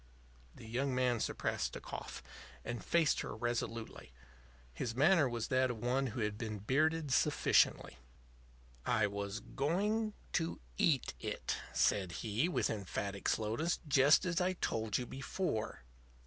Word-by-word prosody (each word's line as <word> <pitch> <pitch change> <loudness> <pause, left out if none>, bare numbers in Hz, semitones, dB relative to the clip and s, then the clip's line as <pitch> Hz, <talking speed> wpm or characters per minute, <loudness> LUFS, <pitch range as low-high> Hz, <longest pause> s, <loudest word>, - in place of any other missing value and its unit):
The - - -11
young 130 +3 -1
man 125 -2 +2
suppressed - - -1
a - - -4
cough - - -7 0.4
and 120 -1 -4
faced 165 -3 +3
her - - -4
resolutely. 115 - -3 0.6
His 115 - -3
manner 155 +1 +5
was 120 -2 -3
that 130 0 +3
of 120 - -3
one 125 +4 0
who 120 0 -4
had 105 0 -2
been 110 -2 -3
bearded 150 +7 +1
sufficiently. 145 - +3 0.8
"I 110 - +2
was 100 +1 -3
going 210 +9 0 0.2
to 165 -1 0 0.2
eat 135 - +2
it," - - -3
said 95 -4 +2
he, 115 - +1
with - - +1
emphatic 100 -1 -3
slowness; 115 +11 0
"just 145 +4 +5
as 175 -1 +1
I 185 +1 +2
told 110 - -1
you 125 - -3
before." 135 - -3
125 Hz, 140 wpm, -35 LUFS, 110-155 Hz, 0.8 s, manner